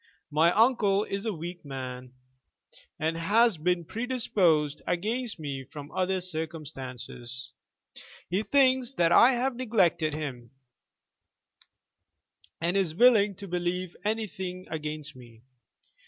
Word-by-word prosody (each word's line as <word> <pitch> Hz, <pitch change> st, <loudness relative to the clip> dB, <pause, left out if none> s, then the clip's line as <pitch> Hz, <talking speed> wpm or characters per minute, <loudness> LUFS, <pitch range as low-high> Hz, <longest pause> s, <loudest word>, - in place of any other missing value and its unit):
My 160 Hz, +3 st, +4 dB
uncle 210 Hz, -3 st, +3 dB
is 200 Hz, +1 st, -4 dB
a -, -, +1 dB
weak 175 Hz, 0 st, -7 dB
man, 130 Hz, -2 st, -7 dB, 0.8 s
and 160 Hz, +1 st, -1 dB
has 205 Hz, +3 st, +3 dB
been 175 Hz, +1 st, 0 dB
predisposed 185 Hz, -, +1 dB
against 220 Hz, +7 st, -1 dB
me 140 Hz, -4 st, -5 dB
from 145 Hz, +2 st, -10 dB
other 185 Hz, 0 st, 0 dB
circumstances. 135 Hz, -7 st, -5 dB, 0.8 s
He 185 Hz, +4 st, 0 dB
thinks 260 Hz, 0 st, +3 dB
that 170 Hz, -9 st, +2 dB
I 245 Hz, +8 st, +7 dB
have 250 Hz, +1 st, 0 dB
neglected 175 Hz, -11 st, +1 dB
him, 130 Hz, -6 st, -6 dB, 2.1 s
and 170 Hz, +3 st, 0 dB
is 185 Hz, -5 st, +1 dB
willing 210 Hz, -3 st, +5 dB
to 200 Hz, +1 st, -9 dB
believe 180 Hz, 0 st, -2 dB
anything 190 Hz, -4 st, -3 dB
against 150 Hz, -2 st, -5 dB
me. 120 Hz, -2 st, -15 dB
175 Hz, 110 wpm, -28 LUFS, 150-210 Hz, 2.1 s, I